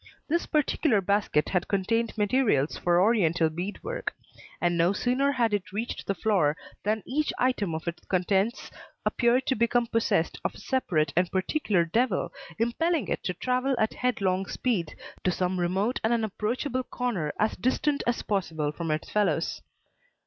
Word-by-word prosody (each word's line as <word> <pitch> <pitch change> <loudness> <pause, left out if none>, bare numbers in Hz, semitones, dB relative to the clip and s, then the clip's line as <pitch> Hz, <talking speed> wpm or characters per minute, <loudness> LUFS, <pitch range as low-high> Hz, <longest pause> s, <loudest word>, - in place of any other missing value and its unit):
This 340 +3 0
particular 300 -5 +2
basket 200 -5 +1
had 180 - 0
contained 225 +4 0
materials 205 - +2
for 175 0 +2
Oriental 180 -6 +3
bead 180 +6 -5
work; - - -4 0.4
and 175 0 +1
no 170 +3 +3
sooner 255 +7 +1
had 235 -4 +1
it 185 -3 -2
reached 220 +5 -4
the 195 - 0
floor 175 -8 +2 0.2
than 215 +1 -1
each 300 +4 0
item 210 -9 +1
of 160 +2 -6
its 170 - -4
contents 195 +5 0 0.3
appeared 245 +2 +2
to - - +2
become 235 +1 +2
possessed 225 -8 0
of - - -2
a - - -11
separate 160 - 0
and 175 +1 +2
particular 190 - +1
devil 220 +3 0 0.2
impelling 275 - 0
it - - -2
to 180 - -1
travel 255 +5 0
at 220 -1 +1
headlong 195 -6 0
speed 200 -11 -1 0.3
to - - +2
some 180 0 0
remote 190 +8 0
and 220 - +2
unapproachable 235 +4 -1
corner 215 -15 -2
as 215 +1 +2
distant 280 +3 0
as 240 - 0
possible 160 -7 -1
from 165 +2 -5
its 155 0 -1
fellows. 175 -6 0
205 Hz, 160 wpm, -27 LUFS, 180-245 Hz, 0.4 s, Oriental